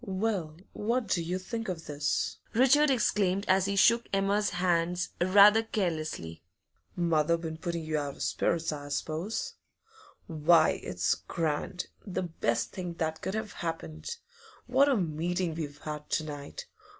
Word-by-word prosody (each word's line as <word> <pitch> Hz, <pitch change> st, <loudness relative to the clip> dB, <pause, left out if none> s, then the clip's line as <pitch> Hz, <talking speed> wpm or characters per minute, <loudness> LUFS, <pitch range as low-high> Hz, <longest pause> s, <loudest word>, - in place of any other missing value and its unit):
'Well, 190 Hz, -6 st, -2 dB, 0.2 s
what 235 Hz, +3 st, 0 dB
do 175 Hz, -, +2 dB
you 175 Hz, +3 st, -2 dB
think 225 Hz, +3 st, -5 dB
of 170 Hz, -3 st, -5 dB
this?' 145 Hz, 0 st, -1 dB, 0.2 s
Richard 270 Hz, +5 st, +5 dB
exclaimed 200 Hz, -6 st, +1 dB
as 190 Hz, 0 st, +4 dB
he 200 Hz, -, -1 dB
shook 235 Hz, +4 st, +4 dB
Emma's 200 Hz, +1 st, +2 dB
hands 175 Hz, 0 st, 0 dB
rather 205 Hz, +4 st, +7 dB
carelessly. 155 Hz, -, -3 dB, 0.5 s
'Mother 170 Hz, -2 st, +2 dB
been 160 Hz, -1 st, -5 dB
putting 170 Hz, 0 st, -3 dB
you 155 Hz, -1 st, -1 dB
out 145 Hz, -1 st, -4 dB
of -, -, -5 dB
spirits, 165 Hz, -1 st, 0 dB
I 145 Hz, -1 st, -6 dB
suppose? 160 Hz, +8 st, -3 dB, 0.7 s
Why, 160 Hz, 0 st, +4 dB
it's 90 Hz, 0 st, 0 dB
grand; 165 Hz, +2 st, -3 dB, 0.2 s
the 190 Hz, -2 st, -3 dB
best 120 Hz, -9 st, -1 dB
thing 180 Hz, -2 st, -5 dB
that 160 Hz, -1 st, -2 dB
could 190 Hz, -, -3 dB
have 220 Hz, -1 st, -4 dB
happened! 165 Hz, -, -5 dB, 0.5 s
What 265 Hz, +3 st, +4 dB
a 270 Hz, -, +3 dB
meeting 175 Hz, 0 st, -1 dB
we've 150 Hz, -3 st, -5 dB
had 150 Hz, 0 st, -7 dB
to 155 Hz, -, 0 dB
night! 145 Hz, -, -7 dB
175 Hz, 150 wpm, -29 LUFS, 155-200 Hz, 0.7 s, rather